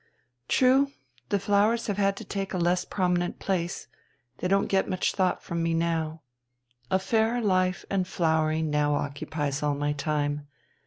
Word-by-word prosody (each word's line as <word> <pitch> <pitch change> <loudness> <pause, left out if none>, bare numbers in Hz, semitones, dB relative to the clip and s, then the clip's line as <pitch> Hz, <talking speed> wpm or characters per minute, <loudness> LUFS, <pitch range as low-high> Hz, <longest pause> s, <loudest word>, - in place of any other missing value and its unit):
"True, 265 +2 +4 0.4
the 205 - +2
flowers 205 +4 +2
have 205 -2 -2
had 195 -1 +2
to - - -7
take 195 -1 -3
a - - 0
less 180 +1 +1
prominent 180 -2 0
place, 175 -3 -2 0.5
they 180 - -1
don't 195 +1 +3
get 195 0 +1
much 185 -1 0
thought 185 -2 0
from 170 0 -3
me 165 0 +1
now. 165 -1 -1 0.7
A - - +3
fairer 220 +5 +1
life 185 -4 +1
and 190 -2 0
flowering 160 -2 +1
now 150 0 +2
occupies 145 0 -3
all 145 -1 +1
my 145 +1 0
time. 145 0 -2
180 Hz, 160 wpm, -27 LUFS, 155-195 Hz, 0.7 s, True